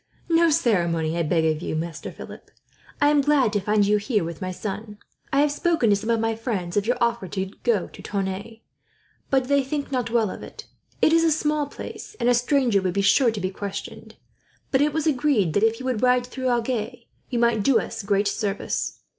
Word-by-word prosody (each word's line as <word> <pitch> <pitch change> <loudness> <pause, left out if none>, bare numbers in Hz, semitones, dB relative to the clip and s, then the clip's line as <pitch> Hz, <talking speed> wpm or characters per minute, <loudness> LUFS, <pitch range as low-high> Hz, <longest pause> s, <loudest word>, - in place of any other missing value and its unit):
"No 335 0 +4
ceremony, 170 - +1
I 170 - 0
beg 165 0 +1
of 155 0 0
you, 155 - -3
Master 165 +1 -4
Philip. - - -11 0.5
I 290 - +4
am 295 -1 +4
glad 275 -6 +2
to 205 - +2
find 210 +1 +2
you 210 +1 +3
here, 210 -1 0
with 165 -1 -6
my 185 - -3
son. 205 +3 -6 0.3
I 275 - +3
have 295 0 +2
spoken 305 - +1
to - - +5
some 215 +3 -4
of 230 -1 +2
my 225 0 0
friends 205 -7 -3
of 205 +1 +1
your 245 - +1
offer 235 -4 0
to 190 +1 -4
go 225 -6 +1
to - - -13
Tonneins, 200 +3 -4 0.7
but 265 -1 +3
they 280 0 +3
think 280 +1 -4
not 250 -3 -1
well 225 -4 +1
of - - -8
it. - - -10 0.4
It 315 - +5
is 330 0 +5
a 325 - +3
small 300 -1 0
place, 285 - -9
and - - 0
a 245 - +5
stranger 245 -3 +2
would 185 -1 -2
be 200 - +1
sure 235 +5 +4
to 220 -2 -3
be 185 -1 -2
questioned; 200 0 -7 0.6
but 265 - +3
it 300 +1 +3
was 315 +2 -2
agreed 265 - +2
that, 205 - +2
if 225 +1 +2
you 260 - -7
would 255 -5 -1
ride 250 -1 +3
through 260 +1 -3
Agen, 240 0 -1 0.3
you 245 - -2
might 235 -2 +2
do 270 +4 +4
us 225 - -5
great 200 0 +1
service. 200 -1 -2
225 Hz, 220 wpm, -24 LUFS, 200-265 Hz, 0.7 s, to